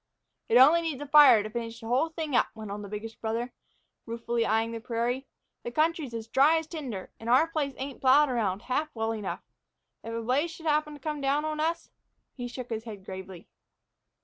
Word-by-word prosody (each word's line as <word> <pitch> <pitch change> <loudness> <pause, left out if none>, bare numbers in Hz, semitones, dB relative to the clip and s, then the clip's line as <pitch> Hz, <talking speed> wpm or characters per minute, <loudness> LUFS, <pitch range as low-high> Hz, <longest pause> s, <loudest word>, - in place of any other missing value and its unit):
"It 230 - +5
only 300 +7 +7
needs 320 -5 -3
a - - -7
fire 285 -7 +7
to 215 - -5
finish 230 0 -5
the 230 - -11
whole 260 +7 +2
thing 315 -4 -3
up," - - +4
went 215 -2 -7
on 205 +1 -5
the 200 - -8
biggest 215 +2 -7
brother, 230 +2 -2 0.5
ruefully 230 0 -1
eying 225 +1 +1
the 230 - -5
prairie. 240 +3 -2 0.3
"The - - -5
country's 310 -2 0
as 225 -1 -5
dry 275 +7 +4
as 320 - -2
tinder. 270 - -6
And 225 - -6
our 255 +6 +6
place 300 -5 -3
ain't 270 0 -6
plowed 275 +3 +6
around 215 -6 -1
half 295 +5 -1
well 225 0 -1
enough. 215 -3 -4 0.6
If 230 - -6
a 230 - -3
blaze 270 +8 +1
should 325 0 -11
happen 300 -1 +1
to - - -12
come 300 0 -4
down 280 +2 +1
on 310 0 -3
us" 330 +1 -1 0.4
he 245 -2 -5
shook 245 0 -8
his 220 0 -3
head 205 -4 -9
gravely. 190 -2 -9
245 Hz, 210 wpm, -28 LUFS, 225-300 Hz, 0.6 s, only